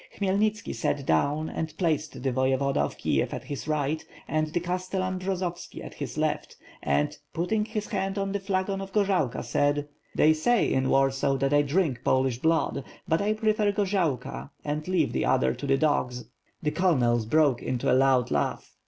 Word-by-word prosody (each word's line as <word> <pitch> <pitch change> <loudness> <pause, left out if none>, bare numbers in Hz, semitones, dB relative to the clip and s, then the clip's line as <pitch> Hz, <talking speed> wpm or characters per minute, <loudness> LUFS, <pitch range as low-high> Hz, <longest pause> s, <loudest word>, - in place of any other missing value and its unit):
Khmyelnitski 205 +2 0
sat 140 -2 -1
down 150 +3 +1
and 160 -1 -4
placed 155 -6 -1
the 135 - +1
Voyevoda 130 +2 +1
of 70 - -1
Kiev - - 0
at - - -6
his 145 +1 -6
right, 155 0 0 0.2
and 155 +1 0
the 160 +3 -1
Castellan 185 +1 -2
Bjozovski 185 -2 -4
at - - -9
his - - -6
left, - - -1 0.3
and, 70 +1 +1 0.2
putting 210 +6 0
his 215 -1 -3
hand 195 -2 -2
on 195 0 -1
the 200 - -1
flagon 195 0 -1
of 195 0 -7
gorzalka, 195 - +1
said: 145 +4 +1 0.3
"They 155 - +5
say 210 +9 +2
in 130 0 +1
Warsaw 135 0 +2
that 135 +1 0
I 145 - +6
drink 145 -4 0
Polish 130 -2 +2
blood; 160 -2 +1 0.2
but 160 +3 +2
I 210 +1 +2
prefer 215 -1 +1
gorzalka 175 - -1 0.2
and 150 +2 -3
leave 185 0 +1
the - - 0
other 65 0 +2
to 140 - -6
the 135 0 +3
dogs." 130 -5 0 0.4
The 150 - +1
colonels 120 -12 +2
broke 145 -2 +3
into 125 -2 0
a - - +5
loud 130 -1 +3
laugh. - - -1
155 Hz, 180 wpm, -27 LUFS, 135-190 Hz, 0.4 s, I